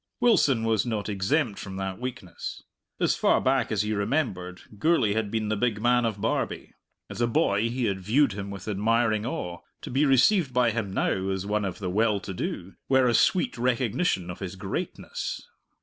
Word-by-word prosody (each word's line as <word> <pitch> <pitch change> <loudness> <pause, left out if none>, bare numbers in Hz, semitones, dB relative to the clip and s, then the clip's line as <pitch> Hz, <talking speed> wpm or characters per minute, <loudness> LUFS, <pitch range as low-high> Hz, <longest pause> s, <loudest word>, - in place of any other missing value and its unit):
Wilson 150 - +4
was 110 -3 +2
not 110 -4 -3
exempt 105 +4 0
from 95 -1 -7
that 95 -1 -4
weakness. 125 -7 -6 0.4
As - - +2
far - - +3
back 130 -3 +1
as 105 -1 +1
he 105 0 -1
remembered 100 -5 -2 0.2
Gourlay 130 -7 +3
had 110 -1 -1
been 110 0 -1
the 110 - +1
big 105 0 0
man 120 +1 +3
of 110 -3 -2
Barbie; 110 +3 -2 0.3
as - - -6
a 120 - +3
boy 115 -5 +2
he 125 +1 -1
had 100 -3 -1
viewed 115 +5 +3
him 100 0 -5
with 100 -1 -8
admiring 110 +1 +1
awe; 90 -8 -4 0.2
to - - -7
be 135 +4 +2
received 135 - +4
by 125 -2 +4
him 110 -3 -3
now, 95 0 0
as 95 0 -2
one 105 0 0
of 95 - -4
the 95 -3 -3
well 105 +1 +2
to 95 - -7
do, 90 +1 -4 0.2
were 130 -1 +4
a 120 - +3
sweet 180 -1 +2
recognition 120 - 0
of 90 - -9
his 95 -1 -5
greatness. 95 0 -5
110 Hz, 195 wpm, -26 LUFS, 100-125 Hz, 0.4 s, Wilson